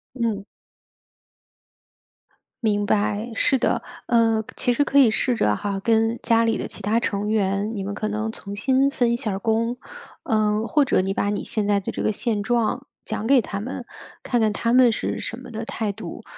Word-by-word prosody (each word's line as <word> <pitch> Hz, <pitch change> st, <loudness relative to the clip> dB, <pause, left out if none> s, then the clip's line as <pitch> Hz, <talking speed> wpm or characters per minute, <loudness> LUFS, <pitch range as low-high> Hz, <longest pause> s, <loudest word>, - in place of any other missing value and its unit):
嗯。 225 Hz, -5 st, -1 dB, 2.2 s
明 205 Hz, -2 st, +2 dB
白， 210 Hz, +3 st, 0 dB
是 270 Hz, -, +3 dB
的。 -, -, 0 dB, 0.2 s
呃， 225 Hz, -2 st, +3 dB
其 245 Hz, -, +1 dB
实 285 Hz, +4 st, +2 dB
可 280 Hz, -, +2 dB
以 260 Hz, -5 st, +7 dB
试 245 Hz, +2 st, +1 dB
着 105 Hz, -, +2 dB
哈， 200 Hz, -, -3 dB
跟 225 Hz, +2 st, +2 dB
家 230 Hz, -1 st, +4 dB
里 225 Hz, -1 st, +1 dB
的 -, -, -3 dB
其 -, -, -10 dB
他 210 Hz, +4 st, +2 dB
成 205 Hz, -2 st, -1 dB
员， 205 Hz, 0 st, 0 dB
你 195 Hz, -, -3 dB
们 200 Hz, -, -4 dB
可 215 Hz, +1 st, -2 dB
能 215 Hz, +1 st, -2 dB
重新 260 Hz, +8 st, 0 dB
分 240 Hz, -3 st, +1 dB
一 -, -, +1 dB
下 235 Hz, -4 st, -3 dB
儿 195 Hz, -, -2 dB
工， 230 Hz, +3 st, 0 dB, 0.5 s
呃， 215 Hz, 0 st, +1 dB
或 295 Hz, +2 st, +3 dB
者 245 Hz, -, +2 dB
你 190 Hz, +1 st, -1 dB
把 205 Hz, -, 0 dB
你 205 Hz, -, -2 dB
现 210 Hz, -2 st, -2 dB
在 200 Hz, -1 st, +3 dB
的 195 Hz, -, -4 dB
这 -, -, -4 dB
个 -, -, +2 dB
现 215 Hz, 0 st, -1 dB
状 240 Hz, +3 st, 0 dB, 0.2 s
讲 220 Hz, +1 st, -3 dB
给 270 Hz, -2 st, +6 dB
他 200 Hz, -2 st, -5 dB
们， 245 Hz, +2 st, -6 dB, 0.4 s
看 240 Hz, -2 st, +1 dB
看 215 Hz, -1 st, +2 dB
他 230 Hz, +3 st, 0 dB
们 250 Hz, -1 st, +6 dB
是 -, -, -2 dB
什 230 Hz, -, -5 dB
么 250 Hz, -2 st, -11 dB
的 225 Hz, +1 st, -4 dB
态 220 Hz, -2 st, -3 dB
度。 -, -, -8 dB
220 Hz, 215 characters per minute, -23 LUFS, 205-235 Hz, 2.2 s, 以